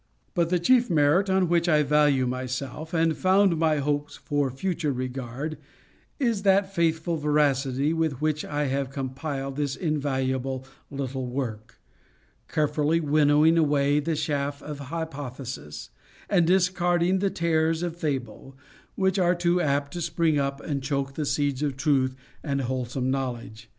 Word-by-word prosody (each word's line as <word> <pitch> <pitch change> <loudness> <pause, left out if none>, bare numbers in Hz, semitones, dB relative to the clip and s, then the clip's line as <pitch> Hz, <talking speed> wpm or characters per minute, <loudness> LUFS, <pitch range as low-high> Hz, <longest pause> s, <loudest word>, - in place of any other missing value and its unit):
But 170 -1 +1
the 180 - +2
chief 245 +8 +3
merit 165 +4 +3
on 190 -1 +3
which 170 0 +2
I 150 -2 +4
value 145 -2 +3
myself, 130 +5 -4
and 165 -2 +2
found 190 -2 +3
my 160 -2 +2
hopes 145 0 -1
for 145 -2 -1
future 155 +3 -2
regard, 130 +3 -4 0.6
is 235 -7 +1
that 195 0 +3
faithful 165 -1 0
veracity 145 -1 +1
with 160 -5 -1
which 155 0 0
I 150 0 -2
have 135 0 -1
compiled 135 0 -4
this 145 -2 -1
invaluable 135 -4 -1 0.2
little 135 -2 -4
work; 120 -4 -5 0.7
carefully 155 +1 +1
winnowing 150 +1 +4
away 145 -1 +3
the 160 +2 -1
chaff 145 -2 -2
of 150 -1 -6
hypothesis, 135 - -6 0.4
and 175 -5 +3
discarding 180 0 +2
the 200 +1 +1
tares 165 -1 +1
of 170 -2 -3
fable, 135 -4 -4 0.4
which 190 0 +1
are 180 0 +3
too 175 0 +1
apt 140 -2 0
to 175 - -4
spring 160 -2 +1
up 140 0 -1
and 140 -3 -3
choke 135 0 -2
the 150 0 -3
seeds 145 -1 0
of 145 -3 -1
truth 135 -3 +1 0.3
and 140 -3 -1
wholesome 130 0 -2
knowledge. 120 -5 -4
145 Hz, 145 wpm, -26 LUFS, 135-165 Hz, 0.7 s, I